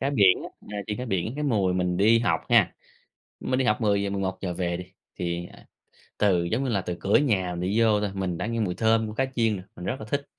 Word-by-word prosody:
cá 140 - 0
biển 100 -9 +4 0.3
á, 105 - -5
chiên 105 -1 -3
cá 125 - -3
biển. 95 -1 -1
Cái 150 - -3
mùi 100 -9 +1
mình 90 -1 0
đi 110 +4 +5
học 115 - +1
ha, 110 -7 +4 0.7
mình 130 0 -1
đi 130 - +1
học 105 +1 +1
10:00-11:00 100 -3 -1
về 85 -1 -2
đi, 90 - -7 0.3
thì, 85 0 -3
à, - - -17 0.5
từ 95 -5 +3
giống 110 +10 -1
như 130 - -1
là 100 -3 +1
từ 90 -1 -4
cửa 100 - +3
nhà 95 -11 +1
mình 85 - -4
đi 110 +3 +2
vô 110 -2 +4
thôi, 105 -1 -1
mình 95 -3 -2
đã 90 - -2
nghe 115 0 -2
mùi 90 -4 0
thơm 110 0 +2
của 105 - -7
cá 135 +4 +1
chiên 115 -3 +2
rồi. 90 - -9
Mình 90 - -8
rất 130 - -2
là 110 - -7
thích. 140 0 -1
105 Hz, 255 wpm, -26 LUFS, 90-115 Hz, 0.7 s, đi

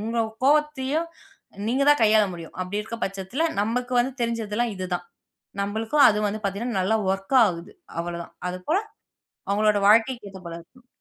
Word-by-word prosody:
உங்க 230 +2 -2 0.3
கோபத்தையும் 300 +1 +2 0.6
நீங்கத் 275 +4 +3
தான் 295 - +4
கையாள 215 0 +5
முடியும். 165 -1 -10
அப்பிடி 195 +3 -2
இருக்க 230 +1 -7
பட்சத்துல 195 - -3 0.2
நமக்கு 245 +4 -1
வந்து 255 +2 -1
தெரிஞ்சது 230 -3 -2
எல்லாம் 240 -2 0
இது 185 0 -4
தான். - - -4 0.6
நம்மளுக்கும் 220 +8 +2
அது 210 -1 +2
வந்து 215 +1 -5
பாத்தீங்கன்னா, 200 +2 -2
நல்ல 200 +4 +1 0.2
ஒர்க் 195 +7 0
ஆகுது. 175 0 -5 0.3
அவளதான். 170 0 -6
அது 180 0 -4
போல 350 +5 +3 0.7
அவுங்களோட 210 +1 +3
வாழ்க்கைக்கு 230 +1 +3
ஏத்தபோல 175 -3 -8
இருக்கணும். 250 +9 -20
220 Hz, 160 wpm, -24 LUFS, 195-250 Hz, 0.7 s, கையாள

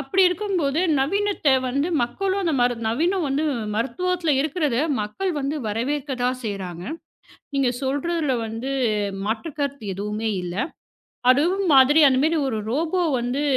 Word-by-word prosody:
அப்டி 285 +8 +2
இருக்கும்போது 355 -6 -1 0.2
நவீனத்தை 390 0 +1 0.2
வந்து 280 +6 0
மக்களும் 380 +11 -1
அந்த 335 -3 0
மருந் 245 -2 +1
நவீன 320 - +1
வந்து 280 +3 0 0.3
மருத்துவத்துல 330 +8 0
இருக்கிறத 300 -3 0 0.2
மக்கள் 290 - -2
வந்து 280 +2 -2
வரவேற்கதான் 255 +2 -1
செய்றாங்க. 185 -5 -5 0.7
நீங்க 275 -2 +2
சொல்றதுல 285 +2 0
வந்து 225 +4 -5 0.6
மாற்றுக் 230 +8 -3
கருத்து 280 -4 -3
எதுவுமே 210 +3 -3
இல்ல. 175 -1 -5 0.8
அதுவும் 345 +9 +2
மாதிரி 270 +4 +6
அந்த 260 -1 +2
மாரி 320 +2 +2
ஒரு 220 - -2
ரோபோ 320 +8 0 0.2
வந்து 245 +4 -1
275 Hz, 130 wpm, -23 LUFS, 240-330 Hz, 0.8 s, மாதிரி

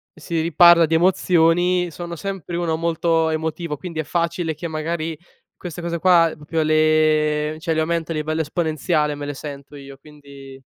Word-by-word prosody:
si 165 0 -4
riparla 170 +1 +6
di 160 - 0
emozioni, 175 0 +2
sono 170 +2 -7
sempre 185 0 -6
uno 170 -2 -1
molto 165 0 +1
emotivo 160 0 -3
quindi 165 +1 -7
è - - 0
facile 170 0 -2
che 170 +3 -6
magari 160 0 -3 0.4
queste 175 -1 -8
cose 170 -1 -3
qua 170 -2 +4
proprio 155 +2 -3
le 155 -1 +2
cioè, 160 +1 -2
le 160 - 0
aumento 165 0 -2
a - - -5
livello 155 +1 -2
esponenziale 155 -1 -1
me 145 0 -6
le 145 - -4
sento 140 0 -9
io, 140 -1 -11
quindi 140 -2 -14
160 Hz, 165 wpm, -21 LUFS, 155-170 Hz, 0.4 s, riparla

